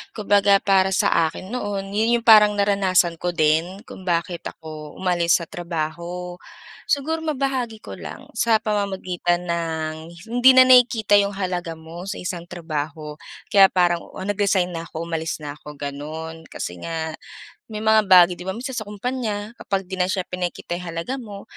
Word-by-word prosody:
Kumbaga, 205 -2 +4
para 190 -1 +4
sa 165 -3 +3
akin 185 +5 -10
noon 200 -4 -4
'yon 225 +3 +2
yung 235 - -8
parang 210 -3 +7
naranasan 190 -4 +2
ko 180 - 0
din 165 +6 +1
kung - - -11
bakit 170 0 -1
ako 155 -2 -9
umalis 175 -2 +2
sa - - -6
trabaho. 175 +2 -5 0.5
Siguro 320 +3 0
mabahagi 265 -7 -2
ko - - -9
lang - - -9
sa 225 -2 +3
pamamagitan 185 -4 -1
ng 160 -2 -2 0.3
hindi 245 +3 +6
na 255 0 +7
nakikita 245 -5 +5
yung 200 0 +3
halaga 180 -3 -3
mo 165 +2 -10
sa 195 +2 -5
isang 180 -2 -4
trabaho, 155 -2 -5 0.3
kaya 195 -2 +6
parang 175 -2 +2 0.2
nag-resign 195 -1 +1
na 165 - -4
ako, 165 0 -7
umalis 165 -1 -3
na 145 -1 -7
ako 150 0 -12
gano'n. 155 +3 -6
Kasi 90 0 -6
nga 160 -1 -4 0.6
may 210 - -4
mga 220 -1 +4
bagay 180 -1 +7
'di - - -7
ba 190 - -1
minsan 255 +3 -5
sa 220 - -2
kumpanya 215 -1 -3
kapag 195 -1 -2
di 190 - -4
na 180 - +3
siya 190 0 -1
pinakikita 175 -1 -4
yung 180 - -8
halaga 170 +11 -3
mo, 205 -5 -9
185 Hz, 165 wpm, -22 LUFS, 165-210 Hz, 0.6 s, parang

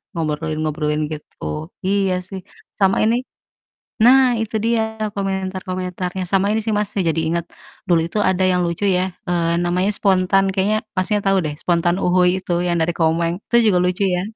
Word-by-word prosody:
ngobrolin 155 -1 -2
ngobrolin 150 0 -1
gitu, 155 +1 -6 0.2
iya 195 -1 +1 0.2
sih, 190 -1 -6 0.4
sama 195 -1 +3
ini 235 +3 +2 0.7
nah 250 +2 +5
itu 220 -1 -2
dia 220 -1 -1
komentar-komentarnya, 185 -1 -3
sama 195 +1 +2
ini 220 - +1
sih 220 - 0
Mas, 205 0 -1
saya 195 -3 -1
jadi 165 - 0
inget, 170 0 -1 0.4
dulu 170 -2 +3
itu 210 - -3
ada 190 -2 +2
yang 180 - +1
lucu 170 +3 -3
ya, 185 -1 +1
eee, 170 -1 +1
namanya 180 +3 +1
Spontan 195 0 +3
kayaknya 200 +2 +1 0.2
maksudnya 205 +3 0
tau 195 0 +3
deh, 150 - -2
Spontan 175 0 +1
uhuy 180 0 +4
itu 175 - -2
yang 175 - +1
dari 160 - +1
Komeng, 165 +2 +1
itu - - +3 0.2
juga 180 - +3
lucu 180 +2 0
ya. 180 - -1
185 Hz, 170 wpm, -20 LUFS, 170-200 Hz, 0.7 s, nah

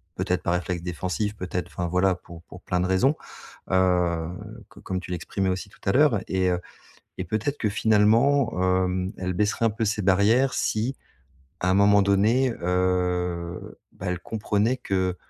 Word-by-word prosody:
peut-être 90 -1 -1
par 85 - 0
réflexe 90 -1 -2
défensif, 90 +4 -3
peut-être 90 -2 -4
enfin, 90 - -4
voilà, 90 +2 +2
pour 85 -1 -13
pour 90 - -13
plein 90 0 -1
de 90 - +1
raisons. 95 +11 +2 0.5
Heu, 90 -3 +2 0.4
co - - -16
comme 95 -1 -3
tu 90 - -9
l'exprimais 95 +2 -2
aussi 95 +2 -3
tout - - -21
à 95 - +3
l'heure 135 -3 +4
et 95 -1 +1
heu, 90 -1 0 0.6
et - - -1
peut-être 110 - -2
que, 105 - 0
finalement, 110 +5 +3 0.3
hem, 90 +2 -2
elle 90 0 -2
baisserait 105 +4 0
un - - +4
peu 110 +1 -2
ses 105 0 -1
barrières 105 +7 +3
si, 115 +5 -1 0.7
à 90 - +1
un - - +3
moment 100 +1 +5
donné, 110 +7 +3
heu, 90 -1 -1
bah, 95 - -8
elle 90 0 -1
comprenait 105 +4 0
que 95 -4 -1
95 Hz, 175 wpm, -25 LUFS, 90-105 Hz, 0.7 s, moment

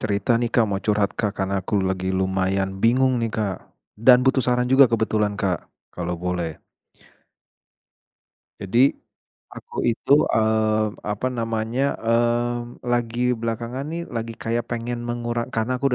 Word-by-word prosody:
cerita 105 +2 +1
nih 120 -1 -1
Kak, 115 -3 +3
mau 100 -1 -2
curhat 105 -1 +1
Kak, 105 -2 -2
karena 95 0 0
aku 100 +2 0
lagi 95 0 -1
lumayan 95 +1 -1
bingung 125 +1 +3
nih 115 - -1
Kak, 105 -4 -2 0.4
dan 125 +3 +5
butuh 130 0 +3
saran 125 0 +1
juga 130 +1 +6
kebetulan 110 -2 0
Kak, 95 -3 -1 0.2
kalau 90 0 -3
boleh. 90 -3 -3 2.0
Jadi, 120 +8 +3 0.5
aku - - -7
itu, 120 +3 0 0.2
eee, 110 -1 +2
apa 105 +4 -3
namanya, 115 +3 -1
mmm, 120 +1 -1
lagi 120 0 0
belakangan 115 +3 -3
nih 165 +2 -4
lagi 115 -1 -4
kayak 115 +1 -2
pengen 120 0 -3
mengura 120 0 -2
karena 125 +1 -2
aku 140 - +3
115 Hz, 140 wpm, -23 LUFS, 100-120 Hz, 2.0 s, juga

